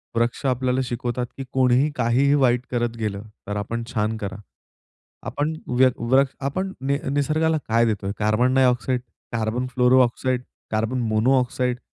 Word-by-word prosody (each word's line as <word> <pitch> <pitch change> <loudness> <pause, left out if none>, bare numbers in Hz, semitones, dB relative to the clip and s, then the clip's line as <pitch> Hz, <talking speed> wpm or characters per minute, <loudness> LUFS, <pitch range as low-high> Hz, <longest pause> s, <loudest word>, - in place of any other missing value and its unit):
वृक्ष 120 +3 0
आपल्याला 130 0 +1
शिकवतात 120 0 -3
की 135 - -4
कोणीही 130 +2 +3
काहीही 125 +4 +2
वाईट 125 -3 +3
करत 120 -1 -1
गेलं, 105 -2 -3 0.2
तर 105 - -3
आपण 115 +3 -3
छान 110 +1 0
करा. 100 -3 -5 0.9
आपण 150 +2 -1
व्य 130 +1 +4
वृक 130 +4 +3 0.2
आपण 185 +7 -2
नि 140 +1 +1
निसर्गाला 155 +3 +1
काय 115 +1 +3
देतोय, 100 -3 -1
carbon 110 +5 +2
dioxide, 125 -1 +2 0.3
carbon 115 +2 -1
fluorooxide, 125 0 +2 0.3
carbon 110 +4 0
monoxide. 125 +2 +1
125 Hz, 135 wpm, -23 LUFS, 115-130 Hz, 0.9 s, व्य